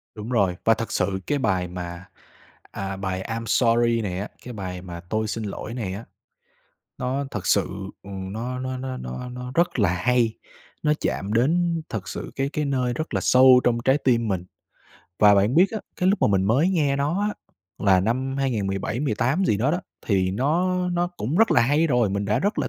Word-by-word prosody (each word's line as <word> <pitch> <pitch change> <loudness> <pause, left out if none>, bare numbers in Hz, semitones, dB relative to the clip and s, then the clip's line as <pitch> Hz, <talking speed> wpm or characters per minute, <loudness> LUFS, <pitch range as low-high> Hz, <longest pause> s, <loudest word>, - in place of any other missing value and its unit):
Đúng 105 +2 -7
rồi. 100 -7 +2
Và 115 - +6
thật 115 +1 -4
sự 95 0 0
cái 145 - +1
bài 95 -8 0
mà, 85 0 -7 0.7
à, 95 0 -4
bài 95 -1 -3
"I'm 115 0 -3
sorry" 115 -1 +3
này 95 -3 -3
á, 100 - -3 0.2
cái 125 - -7
bài 90 -3 -5
mà 85 -2 -8
"Tôi 110 0 0
xin 110 +1 -3
lỗi" 105 +3 -5
này 105 -7 -3
á, 105 +4 -7 0.9
nó 130 +3 -1
thật 110 -7 -5
sự, - - +3 0.3
ừm, 95 -1 -7
nó 125 +3 -4
nó 130 0 -3
nó 130 0 -4
nó 65 - -6
nó 125 0 -7
rất 170 -5 +1
là 100 -5 +4
hay, 115 +4 +1 0.4
nó 150 -1 +3
chạm 100 +2 -2
đến 165 +7 +2
thật 100 -4 -5
sự - - -6
cái 135 0 0
cái 150 +1 -2
nơi 130 -3 0
rất 155 +6 -4
là - - +1
sâu 130 0 +6
trong 120 -1 +2
trái 135 +2 +4
tim 115 -5 +1
mình. 95 -3 -1 0.7
Và 105 -1 +7
bạn 100 +6 +3
biết 185 +4 +5
á, 220 - -3 0.2
cái 180 - +2
lúc 195 0 +1
mà - - +6
mình 95 -2 +2
mới 130 - +3
nghe 145 -6 +1
nó 150 +8 0
á, 210 0 -1 0.4
là 95 -3 +4
năm 130 +6 -1
2017 105 -4 -1
18 140 - +1
gì 105 - +2
đó 125 +8 +1
đó, 175 - 0 0.3
thì 95 -3 +2
nó 165 - +1
nó 175 0 +1
cũng 165 -5 -4
rất 225 +2 +4
là - - +5
hay 145 +7 +3
rồi, 120 -8 +2
mình 100 +1 -1
đã 105 +2 +1
rất 205 +3 0
là - - 0
120 Hz, 210 wpm, -24 LUFS, 100-140 Hz, 0.9 s, Và